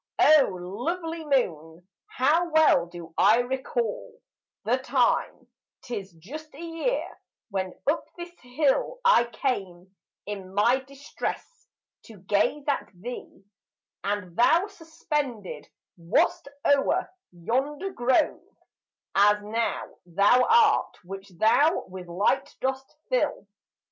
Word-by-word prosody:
O 305 -3 +6
lovely 320 - -4
moon, 175 - -1 0.2
how 315 +7 +2
well 310 - +4
do 170 -1 -11
I 220 - +6
recall 260 - -3 0.4
The - - +1
time,—'tis 220 - -2
just 280 - -10
a - - -12
year—when 330 - -4
up 300 +3 +1
this 345 0 -7
hill 275 - 0
I 240 - +6
came, 195 -7 -4 0.3
in 195 -2 -7
my 240 +6 +4
distress, 275 - -7 0.4
to 220 - -13
gaze 205 +9 0
at 285 - -1
thee: 200 0 -9 0.6
And 200 -4 -3
thou 325 - +4
suspended 300 - -4 0.3
wast 170 +9 +1 0.2
o'er 285 +6 +3 0.2
yonder 270 - -2
grove, 245 -4 +1 0.7
As 205 +1 +5
now 225 +2 -3
thou 200 +8 +4
art, 450 -2 +4
which 195 +2 -9
thou 290 - +3
with 185 -1 -9
light 205 +10 0
dost 265 0 -3 0.2
fill. - - 0
245 Hz, 105 wpm, -26 LUFS, 195-310 Hz, 0.7 s, O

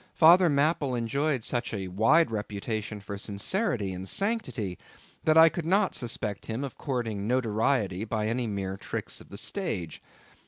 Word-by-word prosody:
Father 175 +2 +7
Mapple 145 -2 +1
enjoyed 135 +3 0
such 120 -1 -2
a 95 -2 -4
wide 115 - +3
reputation 105 0 -4
for 100 0 -6
sincerity 105 - -1
and 95 +1 -5
sanctity, 195 - -1 0.5
that 155 0 +4
I 160 0 +9
could 170 +1 -2
not 190 +4 +2
suspect 110 -4 -3
him 115 +4 -3
of 135 - -5
courting 115 -7 -3
notoriety 110 -4 +1
by 110 -1 -2
any 120 +1 -1
mere 95 -2 -3
tricks - - -5
of - - -16
the 100 - -9
stage. 95 - -3
115 Hz, 155 wpm, -28 LUFS, 100-150 Hz, 0.5 s, I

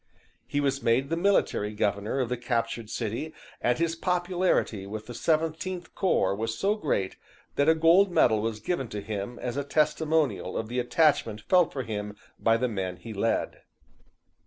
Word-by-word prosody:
He 145 - -1
was 140 -1 0
made 130 +5 +1
the - - +2
Military 165 - +1
Governor 105 +4 0
of 125 -3 0
the 125 - 0
captured 115 -2 -2
city, 115 +9 -4 0.3
and 120 - +2
his 165 0 0
popularity 175 - 0
with 110 +1 -6
the 120 - -8
Seventeenth 165 +6 -1
Corps 180 - +2
was 110 +2 -3
so 200 - +2
great 145 - -1 0.4
that 145 +2 +3
a 160 - +6
gold 170 +5 +5
medal 110 -10 +4
was 110 -1 -2
given 135 - -2
to 105 -1 -5
him 105 +2 -4
as 125 +1 -4
a 140 - 0
testimonial 155 +1 +1
of 110 - -3
the 125 +1 -1
attachment 125 -5 +2
felt 180 - +3
for 130 - -3
him 105 -2 -5 0.2
by 115 0 +3
the 125 +2 0
men 95 -5 -3
he 115 - -8
led. 115 +3 -1
125 Hz, 175 wpm, -27 LUFS, 110-160 Hz, 0.4 s, a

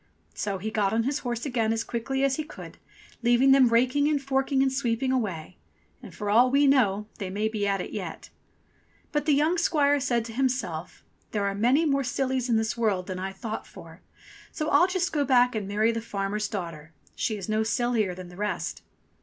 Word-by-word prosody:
So 200 -2 -3
he 215 +4 -4
got 205 -2 +1
on 225 +1 +2
his 275 +4 -1
horse 240 0 -4
again 235 -5 0
as 225 0 -1
quickly 265 +4 -2
as 275 -1 +2
he 310 - -2
could, 300 - -11 0.4
leaving 240 +3 +4
them 270 -2 +6
raking 255 +5 +3
and 300 -1 +2
forking 270 0 +1
and 265 -1 +1
sweeping 255 0 0
away; 190 -10 -3 0.4
and - - -11
for 210 - -6
all 235 +5 +5
we 280 +2 +4
know 210 -7 +3
they 195 -3 -4
may 210 +3 -1
be 215 -2 -2
at 195 -1 0
it - - -7
yet! - - -6 0.8
But 295 +1 -1
the 295 - +5
young 315 +5 +2
squire 290 -4 +3
said 240 -4 0
to 230 - -8
himself, 230 -10 -2 0.3
"There 205 -2 0
are 200 - 0
many 250 +10 +3
more 275 -2 +1
sillies 255 0 -1
in 230 - +3
this 220 0 -1
world 210 -6 0
than 185 -1 -5
I 190 +1 -3
thought 215 +3 -6
for; - - -13 0.5
so 305 -1 -3
I'll 355 - +5
just 365 -1 -1
go 295 -2 +2
back 250 -2 +4
and 210 -3 -3
marry 215 +3 +2
the 230 0 -3
farmer's 210 0 -2
daughter. 165 -6 -6 0.2
She 215 - -1
is 195 - -7
no 215 0 +1
sillier 220 -4 0
than 180 -1 -9
the 180 - -13
rest." 210 +1 -3
235 Hz, 210 wpm, -26 LUFS, 205-270 Hz, 0.8 s, them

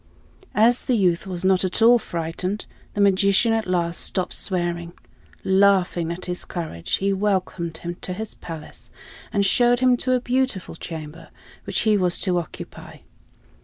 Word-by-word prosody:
As 235 +3 +4
the 255 - +2
youth 180 -1 +1
was 185 -1 -4
not 190 0 +3
at 185 - -2
all 235 +2 +6
frightened, 175 +3 -4 0.3
the 205 - +1
magician 200 +3 +4
at 225 -2 -1
last 170 -2 0
stopped 185 -2 -1
swearing. 175 -2 -2 0.5
Laughing 190 -3 +3
at 175 +2 -6
his 180 0 -3
courage, 160 - -6
he 195 +1 0
welcomed 185 -4 -1
him 175 +1 -5
to 180 - -4
his 220 +3 -6
palace, 160 -2 -9 0.4
and 200 -1 +1
showed 240 +4 +3
him 255 -1 +4
to 255 +1 0
a 250 - +3
beautiful 250 -7 -1
chamber 160 -1 -8 0.4
which - - -1
he 215 -2 +3
was 180 -2 +1
to 180 -3 +2
occupy. 165 - -9
185 Hz, 160 wpm, -23 LUFS, 170-210 Hz, 0.5 s, all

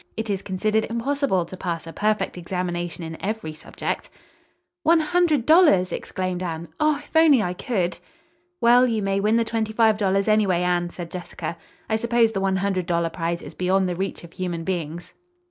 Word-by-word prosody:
It 220 -1 -2
is 195 -1 -1
considered 215 +3 0
impossible 235 - 0
to 180 - -9
pass 170 -3 -4
a 165 - -8
perfect 215 +5 0
examination 175 -1 -3
in 160 0 -8
every 205 -6 -3
subject." 155 - -5 0.7
"One 335 0 +4
hundred 315 -5 +2
dollars!" 310 - +5
exclaimed 185 -1 -3
Anne. 170 -2 -4
"Oh, 305 -1 +3
if 295 +2 -15
I 320 +1 +7
only 235 - +4
could!" 180 -3 -2 0.6
"Well, 245 +1 +6
you 225 -3 -1
may 195 0 +1
win 215 +3 +2
the 230 - +2
twenty 220 -1 -2
five 220 -1 +4
dollars, 195 -1 +1
anyway, 200 -5 +3
Anne," 175 -1 +1
said 170 -1 -8
Jessica. 175 -1 -5 0.3
"I 220 - +1
suppose 235 0 +2
the 195 -3 -2
one 195 -1 +1
hundred 190 -2 -1
dollar 170 -2 0
prize 170 0 -3
is - - -9
beyond 185 +1 +1
the 180 - -2
reach 190 +1 -4
of 170 - -12
human 175 -3 -3
beings." 170 -2 -4
195 Hz, 185 wpm, -23 LUFS, 175-225 Hz, 0.7 s, I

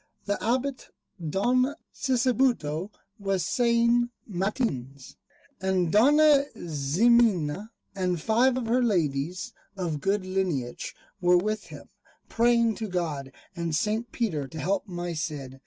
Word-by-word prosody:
The 205 0 -2
Abbot 260 +3 -1 0.4
Don 250 - +2 0.2
Sisebuto 240 - +1 0.3
was 195 -3 -1
saying 235 +1 +2 0.2
matins, 175 - -3 0.5
and 185 -3 +1
Dona 285 +5 +5
Ximena 180 +3 +2 0.2
and 180 -3 -1
five 240 +8 +3
of 250 - -2
her 240 +3 +2
ladies 170 - -1 0.2
of 165 -6 -3
good 195 0 0
lineage 180 -10 -2 0.3
were 180 0 +5
with 215 +3 -1
him, - - -11 0.4
praying 235 -1 +3
to 220 - -3
God 160 -8 -3 0.2
and 170 -3 -2
St. 215 +8 -1
Peter 160 - -2
to 160 +3 -8
help 190 +7 -1
my 175 -2 -4
Cid. 145 -4 -5
195 Hz, 120 wpm, -27 LUFS, 165-235 Hz, 0.5 s, Dona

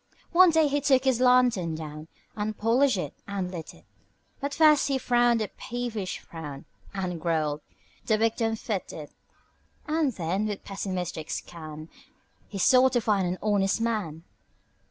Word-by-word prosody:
One 365 +1 +7
day 320 -2 +4
he 290 0 0
took 265 -2 +3
his 260 -3 +2
lantern 250 -10 +3
down 155 0 -7 0.3
And 215 0 -3
polished 245 +2 +3
it 150 -6 -4
and 195 -2 -3
lit 165 -3 -7
it - - -21 0.5
But 280 +1 -3
first 305 -2 +5
he 275 -1 +1
frowned 240 -2 +2
a - - -3
peevish 230 -6 -4
frown 150 -4 -9 0.3
And 180 -4 -4
growled: 155 -3 0 0.5
"The 215 - +3
wick 225 +1 +1
don't 225 -2 0
fit 210 -4 -4
it." 150 -2 -8 0.7
And 305 -2 +1
then, 190 +3 -1
with 205 -2 -5
pessimistic 185 -5 -4
scan, 155 -2 -7 0.6
He 200 - -7
sought 255 +6 +5
to 240 - +2
find 205 -4 +1
an 180 +1 -2
honest 205 -1 +2
man. 210 -9 -2
210 Hz, 155 wpm, -27 LUFS, 170-250 Hz, 0.7 s, One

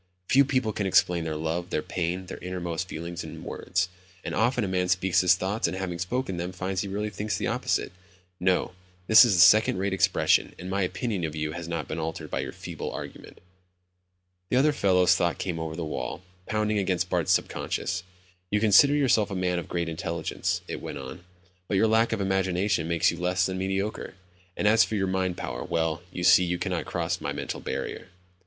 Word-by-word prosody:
Few 140 +2 +6
people 130 -5 0
can 100 -1 -1
explain 90 -2 +3
their 80 -1 -3
love, 80 +3 -3
their 75 - -1
pain, 90 +1 -3
their - - -8
innermost 90 -1 -4
feelings 85 +2 -5
in - - -9
words. 90 0 -2 0.4
And - - -4
often 120 +2 +1
a - - -1
man 90 -1 0
speaks 90 0 +2
his 90 0 +5
thoughts, 95 +4 -1
and 95 - -4
having 90 -2 -4
spoken 95 +1 -2
them, 90 +2 -4
finds 95 +1 -2
he 100 - -4
really 105 +2 -3
thinks 105 +2 -3
the - - -2
opposite. - - -1 0.5
No, 90 0 +1 0.3
this 110 +2 +9
is 95 -8 +5
second 105 +2 +6
rate 95 +1 -1
expression 95 -1 +2
and 90 +1 -7
my 100 +1 0
opinion 95 +1 -2
of 80 -1 -3
you 75 0 -2
has 85 +1 -6
not 85 -2 -3
been 80 - -4
altered 80 0 -5
by - - -1
your - - -3
feeble - - -6
argument." - - -9 1.1
The 125 - +2
other 145 +3 +4
fellow's 90 -7 +4
thoughts 85 -2 0
came 90 -3 -3
over 80 -1 -4
the 85 -1 -4
wall, 75 +3 -4 0.2
pounding 105 -1 0
against 90 -2 0
Bart's 85 -3 +2
sub - - +2
conscious. 90 0 -3 0.5
"You 105 - +1
consider 110 +7 +6
yourself 120 -7 +3
a 100 - -4
man 90 -1 0
of - - -8
great 85 -1 -1
intelligence," 80 0 -2
it - - -5
went - - -6
on, 70 +6 -9 0.4
"but 100 - 0
your 110 - +4
lack 110 +1 +3
of - - -1
imagination 95 -2 0
makes 85 0 +2
you 85 - -7
less 90 +1 +1
than 95 0 -3
mediocre. 95 +1 -3 0.4
And 105 - +1
as 110 +1 +6
for 110 - -3
your 95 -2 +1
mind 95 -1 -1
power, - - -4
well, 80 0 -1
you 90 - -5
see 90 - +7
you 90 0 -1
cannot - - -2
cross - - -2
my - - -2
mental - - -4
barrier." - - -5
90 Hz, 205 wpm, -27 LUFS, 85-100 Hz, 1.1 s, this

